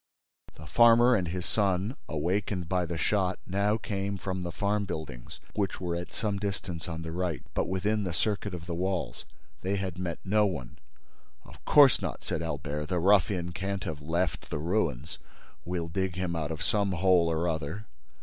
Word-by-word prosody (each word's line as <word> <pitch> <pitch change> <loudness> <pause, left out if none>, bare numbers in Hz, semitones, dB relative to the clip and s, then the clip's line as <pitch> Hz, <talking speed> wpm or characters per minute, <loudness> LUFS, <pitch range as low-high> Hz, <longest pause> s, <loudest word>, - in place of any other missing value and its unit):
The 75 - -11
farmer 120 +7 +6
and 95 -7 +2
his 90 +1 -3
son, 100 +3 +1
awakened 90 +3 -1
by 90 -1 +1
the 85 0 -3
shot, 95 +1 +1
now 100 +3 +1
came 100 -2 -3
from 95 -1 -3
the 85 -1 -3
farm 105 +2 0
buildings, 75 -10 -6
which 100 -2 -1
were 90 -2 -2
at 85 +1 -5
some 105 -3 -2
distance 95 -4 -3
on 80 -1 -4
the 80 - -5
right, 90 -1 -2
but - - 0
within 100 +3 0
the 90 - -2
circuit 100 +2 -1
of 80 -2 -7
the 85 - -4
walls. 90 -5 -2 0.4
They 95 +2 0
had 95 -2 -3
met 90 -2 -2
no 105 +2 +4
one. 70 -11 -5 0.7
"Of - - -15
course 145 -3 +7
not," - - -4
said 80 - -2
Albert. 75 -1 -3
"The 90 - 0
ruffian 95 -1 +3
can't 95 +1 -3
have 75 -2 -4
left 85 +4 -1
the - - -2
ruins—We'll 85 - -3
dig 95 0 -1
him 90 -2 -1
out 80 -2 -2
of 80 -1 -3
some 100 +1 +1
hole 90 -1 +4
or 80 +2 0
other." 80 +5 -3
90 Hz, 180 wpm, -29 LUFS, 85-100 Hz, 0.7 s, course